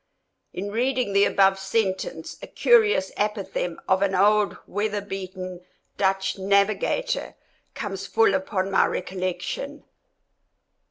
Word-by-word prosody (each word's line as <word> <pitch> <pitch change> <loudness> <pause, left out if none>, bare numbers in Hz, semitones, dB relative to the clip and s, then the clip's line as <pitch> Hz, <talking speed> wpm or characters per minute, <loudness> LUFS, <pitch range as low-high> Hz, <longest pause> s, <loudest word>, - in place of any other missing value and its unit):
In 200 +2 -5
reading 245 -1 0
the 200 0 +5
above 195 -1 +3
sentence 195 - -2
a - - -8
curious 435 - +3
apothegm 200 -4 -2
of 190 0 +3
an 195 -1 +1
old 205 +2 +3
weather 205 +1 -2
beaten 185 -2 -7 0.3
Dutch 195 0 0
navigator 200 - +1 0.4
comes - - -5
full 450 -2 +3
upon 200 -9 -1
my 195 - +4
recollection. 185 +10 -4
200 Hz, 110 wpm, -24 LUFS, 190-215 Hz, 0.4 s, the